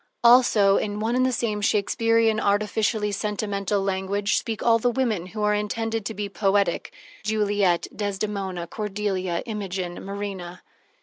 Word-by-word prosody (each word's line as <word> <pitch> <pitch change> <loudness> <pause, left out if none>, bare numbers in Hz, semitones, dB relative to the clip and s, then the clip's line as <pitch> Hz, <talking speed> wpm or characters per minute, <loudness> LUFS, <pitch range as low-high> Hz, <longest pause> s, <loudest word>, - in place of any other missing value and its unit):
Also 235 -5 +6
in 205 0 -2
one 225 +3 0
and 255 0 +3
the - - +1
same 215 -4 -1
Shakespearian, 225 +2 +2
artificially 210 +1 +1
sentimental 200 -1 -1
language 195 +1 0
speak 225 -2 -2
all 230 -1 +4
the 245 - +2
women 230 -8 -1
who 215 +3 -5
are 210 0 +3
intended 225 +1 -2
to 220 - -6
be 205 0 -3
poetic: 200 -2 0 0.3
Juliet, 205 -4 +1
Desdemona, 200 -3 -3
Cordelia, 195 -2 -2
Imogen, 190 -5 -4
Marina. 195 -3 -6
205 Hz, 135 wpm, -24 LUFS, 195-220 Hz, 0.3 s, Also